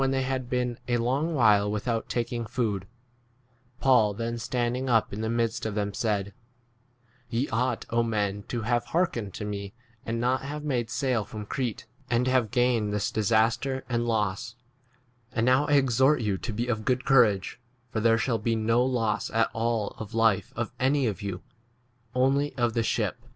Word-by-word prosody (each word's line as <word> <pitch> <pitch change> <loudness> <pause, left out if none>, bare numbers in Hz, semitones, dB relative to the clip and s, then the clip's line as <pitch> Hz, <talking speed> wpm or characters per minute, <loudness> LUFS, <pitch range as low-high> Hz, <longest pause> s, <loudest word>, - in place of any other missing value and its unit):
ACTS 135 - +3
XXVJL - - 0
they 135 - +1
had 130 -1 -2
been 125 -2 -1
a 120 -1 +2
long 135 +8 0
while 105 -5 +4
with 105 +3 -3
out 115 -2 -1
taking 120 -1 -2
food, 105 -5 -2 0.9
Paul 115 -6 +4
then 115 +2 -3
stand 120 +1 -1
ing 130 +1 -3
up 115 -4 +2
in 105 - -4
the 110 - -1
midst 115 0 0
of 110 -2 -3
them 105 -1 -1
said, 100 -3 -1 1.0
Ye 120 +4 0
ought, 125 +1 -1 0.2
men, 105 -2 -1
to 120 -3 -3
have 120 +1 +1
heark 175 +2 +1
ened 105 -5 -5
to 105 - -5
me 100 -1 -5 0.3
and 115 +1 -3
not 125 +2 +1
have 150 +2 -5
made 125 -6 -1
sail 125 -4 0
from 105 +1 -8
Crete 120 +1 -3 0.2
and 120 +1 +2
have 130 -4 +2
gained 120 -2 +2
22 - - -3
this 105 -1 -1
disaster 115 +5 +1
and 120 -1 -1
loss: 105 0 -1 0.8
and 115 -1 +1
now 130 +4 +4
I 145 - +1
exhort 135 0 +4
you 105 -3 0
to 115 - -4
be 115 +3 -2
of 110 -3 -2
good 130 +1 0
courage, 115 -7 +3 0.3
for 110 - -1
there 115 +1 +4
shall 115 -1 0
be 115 +1 0
no 115 +2 +2
loss 120 -4 0
at 115 0 +1
all 115 -2 0
of 110 0 -7
life 115 -3 +2
of 120 0 -3
[any] 135 +1 +2
of 105 -2 -2
you, 100 -3 -5 0.7
only 135 +3 +2
of 120 -2 +2
the 115 - +1
23 - - -1
ship. 110 0 0
115 Hz, 195 wpm, -27 LUFS, 110-125 Hz, 1.0 s, while